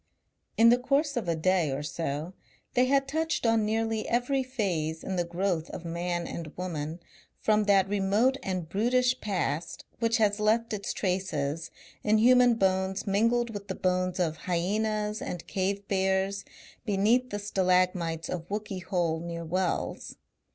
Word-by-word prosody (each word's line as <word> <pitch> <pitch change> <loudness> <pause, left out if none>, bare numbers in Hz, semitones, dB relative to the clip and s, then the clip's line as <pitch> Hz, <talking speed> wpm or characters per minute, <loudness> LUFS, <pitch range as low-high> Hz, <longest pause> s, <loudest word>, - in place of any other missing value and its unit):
In 230 +1 +7
the 245 +1 +5
course 280 +3 +1
of 230 -7 -2
a 170 - +1
day 175 -1 +2
or 135 +2 -3
so 150 +3 -3 0.4
they 250 0 +4
had 275 +1 +2
touched 315 0 -1
on 225 -1 +3
nearly 220 0 -1
every 250 +3 +1
phase 185 -11 -2
in 190 - -3
the 175 - +1
growth 175 -1 -1
of 175 - -7
Man 175 +1 -2
and 165 -3 -7
Woman 165 -2 -4 0.4
from 215 -1 +2
that 195 -2 +4
remote 205 +6 +2
and 185 -4 -3
brutish 250 +7 +2
past 175 -6 -2
which 230 0 +2
has 210 -2 +2
left 225 +2 +2
its 200 -1 -3
traces 170 -5 -2 0.3
in 215 +1 +3
human 245 +1 +6
bones 190 -1 0
mingled 230 +4 +2
with 205 -2 -7
the 190 - -3
bones 185 0 0
of 160 -3 0
hyaenas 210 +4 0
and 175 -2 -5
cave 195 +2 -2
bears 190 +1 0 0.4
beneath 225 +4 +2
the 205 - -3
stalagmites 180 -4 +1
of 175 -1 -5
Wookey 205 -2 -4
Hole 170 -2 0
near 170 0 -5
Wells. 180 +2 -2
195 Hz, 155 wpm, -28 LUFS, 175-225 Hz, 0.4 s, In